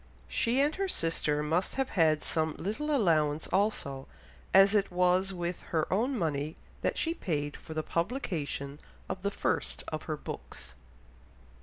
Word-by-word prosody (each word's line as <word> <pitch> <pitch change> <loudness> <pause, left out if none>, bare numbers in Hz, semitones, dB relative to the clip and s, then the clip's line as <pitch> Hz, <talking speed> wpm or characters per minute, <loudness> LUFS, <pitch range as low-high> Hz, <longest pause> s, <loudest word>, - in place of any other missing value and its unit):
She 240 +3 +1
and 295 +2 +3
her 390 0 0
sister 160 - 0
must 165 +5 0
have 270 -1 0
had 155 -4 +3
some 160 -1 0
little 220 - -2
allowance 160 - +3
also, 160 -9 0 0.4
as 195 +1 +7
it 205 -2 +3
was 180 +2 +3
with 175 -1 -3
her 160 -2 +1
own 245 +7 +1
money 155 -3 -1 0.3
that - - 0
she 330 - +1
paid 145 - -2
for 160 - -9
the 155 - 0
publication 165 - -2 0.3
of 185 0 -4
the 200 - +1
first - - -1
of 155 0 -3
her 155 - -2
books. - - -7
175 Hz, 155 wpm, -31 LUFS, 155-205 Hz, 0.4 s, as